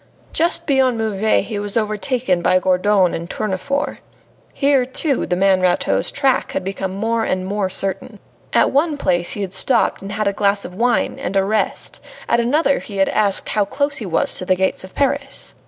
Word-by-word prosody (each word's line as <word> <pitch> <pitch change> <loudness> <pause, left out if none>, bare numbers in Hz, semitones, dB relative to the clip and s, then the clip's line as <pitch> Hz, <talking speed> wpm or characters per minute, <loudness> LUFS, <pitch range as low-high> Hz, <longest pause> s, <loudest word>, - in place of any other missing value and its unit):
Just 335 +1 +1
beyond 265 -5 +2
Meuves 220 -1 +1
he 210 -3 -3
was 205 +1 -1
overtaken 215 -2 0
by 180 +1 +3
Gourdon 185 0 +2
and 170 +1 -5
Tournefort. 275 +11 -2 0.5
Here, 275 -2 +2
too, 265 +2 -1
the 180 - 0
man 190 0 +3
Rateau's 180 -1 +1
track 270 -2 0
became 190 0 -4
more 225 +3 0
and 185 -3 -1
more 200 0 -1
certain. 195 +4 -3 0.3
At - - +3
one 295 +2 +1
place 175 -8 0
he 205 - -4
had 190 -2 -4
stopped 190 - +1
and 195 +1 -6
had 215 -1 -1
a 200 - +1
glass 200 0 +1
of 180 - -8
wine 240 +5 0
and 195 - -4
a 195 - +3
rest, 215 +2 -2 0.3
at 235 - +2
another 280 +4 +2
he 200 - -8
had 195 - +3
asked 200 -2 +1
how 210 - +2
close 280 +6 -1
he 215 - -4
was 165 - +1
to 185 - -4
the 185 - +2
gates 190 0 0
of 185 - -12
Paris. 280 0 -1
205 Hz, 190 wpm, -19 LUFS, 190-255 Hz, 0.5 s, by